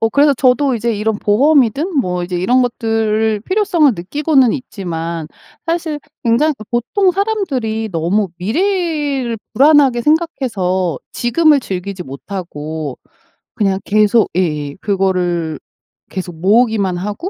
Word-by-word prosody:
어 225 - +2
그래서 285 +3 +3
저도 255 +1 +2
이제 235 +1 -1
이런 215 +1 -1
보험이든 280 - +2
뭐 180 -5 -2
이제 180 0 -4
이런 245 +9 +2
것들을 220 -3 0
필요성을 360 - +2
느끼고는 265 - +2
있지만 170 - -5 0.4
사실 330 -3 -2 0.2
굉장히 275 +7 +2 0.2
보통 355 - +1
사람들이 280 - -1
너무 180 +5 0
미래를 290 - -1 0.2
불안하게 275 -2 +5
생각해서 195 - 0
지금을 295 +4 +3
즐기지 190 -2 -5
못하고 150 -1 -6 0.6
그냥 195 -2 0
계속 215 +2 +3
예예 150 -5 -1
그거를 180 -5 0 0.5
계속 180 -3 -6
모으기만 205 -2 +2
하고 210 - -4
225 Hz, 290 characters per minute, -16 LUFS, 185-285 Hz, 0.6 s, 불안하게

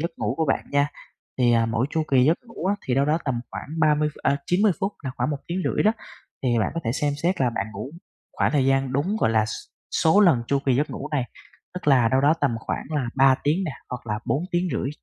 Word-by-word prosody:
giấc 170 +3 -1
ngủ 105 +5 -2
của 160 - +1
bạn - - +1
nha. 145 0 +2 0.5
Thì, 120 -2 +4
à, 115 -1 +3
mỗi 115 +3 0
chu 160 - 0
kỳ 130 -2 +5
giấc 160 +4 +3
ngủ 230 -6 -6
á, 200 - +2
thì 125 - +1
đâu 135 +1 +3
đó 155 +3 +2
tầm 125 -4 -1
khoảng - - -7
30, 150 -1 +3
a, 140 0 +2
90 195 +3 +3
phút 195 +2 -1
là 130 - -2
khoảng 125 +4 0
một 145 - -1
tiếng 175 +2 -3
rưỡi - - +1
đó, 215 - +4 0.5
thì 120 -3 +2
bạn 110 - +1
có 165 - -2
thể 115 - 0
xem 145 +1 0
xét 180 0 0
là 125 -2 +3
bạn 110 -3 -3
ngủ 105 +6 -6 0.4
khoảng - - 0
thời 140 -3 +2
gian 135 -1 +1
đúng, 170 +11 0
gọi 110 - +3
là, 110 -1 +3 0.5
số 160 +6 +4
lần 165 - +5
chu 140 - +1
kỳ 130 - +3
giấc 145 +3 0
ngủ 150 - -6
này, 135 -4 +1 0.5
tức 180 - -3
là 125 -5 +5
đâu 130 +3 +2
đó 150 +3 +4
tầm 145 - +2
khoảng - - -4
là 145 -5 -1
3 135 0 +6
tiếng 160 +7 +1
nè, 155 - -3 0.2
hoặc 125 -1 -6
là 105 0 -2
bốn 150 - 0
tiếng 175 +1 +1
rưỡi. - - -1
140 Hz, 260 wpm, -24 LUFS, 125-160 Hz, 0.5 s, 3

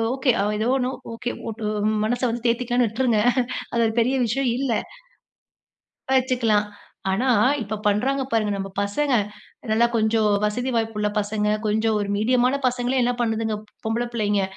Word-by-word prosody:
Okay, 265 -1 +2 0.3
ஏதோ 220 +3 0
ஒண்ணு 255 0 -1 0.2
okay. 235 +1 -4 0.2
ஒட்டு 220 0 -5 0.4
மனச 245 +2 -1
வந்து 240 +1 -5
தேத்திக்கலான்னு 245 0 +1
விட்ருங்க! 230 0 +1 0.5
அது 235 - +2
ஒரு 220 - -2
பெரிய 255 +4 +1
விஷயம் 255 +3 0
இல்ல. 265 -1 -1 1.5
வச்சுக்கலாம். 230 -5 +1 0.4
ஆனா, 250 +7 +1 0.3
இப்ப 215 +1 -4
பண்றாங்க 260 +7 +1
பாருங்க! 215 -2 +1
நம்ம 195 0 -4
பசங்க. 265 +8 0 0.6
நல்லா 225 +2 +4
கொஞ்சம் 220 0 +2 0.2
வசதி 245 +5 -1
வாய்ப்புள்ள 220 -2 0
பசங்க, 210 0 -1 0.2
கொஞ்சம் 220 +1 +1
ஒரு 200 - -3
மீடியமான 250 +4 +2
பசங்களே! 250 +1 0
என்ன 245 +1 +1
பண்ணுதுங்க, 225 -2 -1 0.3
பொம்பள 230 +2 0
பிள்ளைங்க. 205 -3 +1
230 Hz, 140 wpm, -23 LUFS, 215-250 Hz, 1.5 s, நல்லா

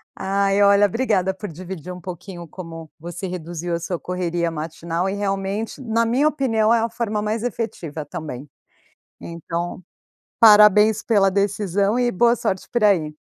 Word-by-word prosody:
Ai, 195 +1 +1
olha, 200 0 +6
obrigada 200 -4 0
por 205 +1 -7
dividir 180 +1 -8
um 180 - -10
pouquinho 175 0 -8
como 165 -1 -9
você 175 +3 -6
reduziu 175 -1 -4
a - - -3
sua 170 +1 -4
correria 175 -2 -2
matinal. 165 +3 -3
E - - -2
realmente, 200 +1 -3
na 230 -1 +1
minha 255 +6 +2
opinião, 230 -7 +2
é 235 - +4
a 230 +1 0
forma 215 -2 -2
mais 215 +2 -2
efetiva 190 -10 -4
também. 145 -2 -7 0.7
Então, 170 +2 -5 0.6
parabéns 210 -1 +7
pela 200 -4 +3
decisão 200 +2 0
e 245 -1 +2
boa 235 +5 +3
sorte 190 -4 -3
por 240 -3 0
aí. 165 -7 +3
195 Hz, 155 wpm, -22 LUFS, 170-215 Hz, 0.7 s, parabéns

